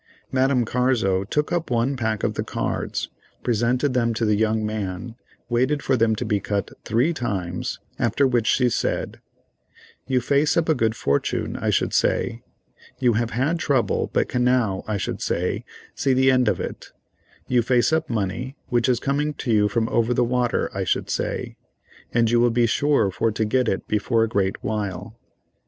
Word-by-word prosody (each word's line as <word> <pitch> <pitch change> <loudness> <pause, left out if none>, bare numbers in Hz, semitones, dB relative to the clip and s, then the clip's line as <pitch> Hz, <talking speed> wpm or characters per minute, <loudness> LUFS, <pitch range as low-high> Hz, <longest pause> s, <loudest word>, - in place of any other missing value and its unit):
Madame 130 -2 +2
Carzo 115 -6 +1
took 150 - -1
up 175 -1 -1
one 120 +3 +1
pack 110 -3 -2
of - - +1
the - - -2
cards, - - -3 0.3
presented 125 +4 +1
them 115 -2 +1
to 115 - 0
the 105 - +3
young 110 0 +1
man, 105 0 -4 0.3
waited 130 +4 +1
for 135 - +2
them 110 -2 +2
to 125 - -4
be 105 -2 +1
cut 100 +1 -2
three 120 +10 +1
times, 95 - -3 0.2
after 140 - +2
which 120 -4 +1
she 125 -1 +3
said: 120 - -2 0.9
"You 130 -1 +2
face 140 +6 +2
up 170 - +2
a 160 - +4
good 115 -5 0
fortune 70 -7 -1
I - - -2
should - - +1
say, 115 0 +1 0.6
you 125 -3 +2
have 115 +1 0
had 145 +9 0
trouble 135 -6 +1
but - - +1
can 125 - 0
now, 120 -6 +1
I 110 -1 -1
should - - -4
say, 90 +2 -1 0.3
see 135 - +1
the 130 +1 +4
end 125 -1 +3
of - - +1
it—you 125 -1 -5
face 125 +4 +2
up 160 0 0
money, 115 +5 -3
which 120 0 +2
is 125 - +2
coming 145 +2 -1
to 120 - -3
you 105 -1 +4
from 115 +1 0
over 115 +1 +1
the - - +3
water, 120 0 0
I - - -2
should - - -1
say, - - -3 0.5
and 115 -1 +3
you 120 - +4
will 120 0 +4
be 120 +1 +2
sure 140 -3 +2
for 110 +4 0
to 110 0 0
get 125 +3 +1
it 95 - -2
before 115 +2 +1
a - - +1
great 100 -3 -1
while. 105 -4 -3
120 Hz, 185 wpm, -23 LUFS, 110-130 Hz, 0.9 s, a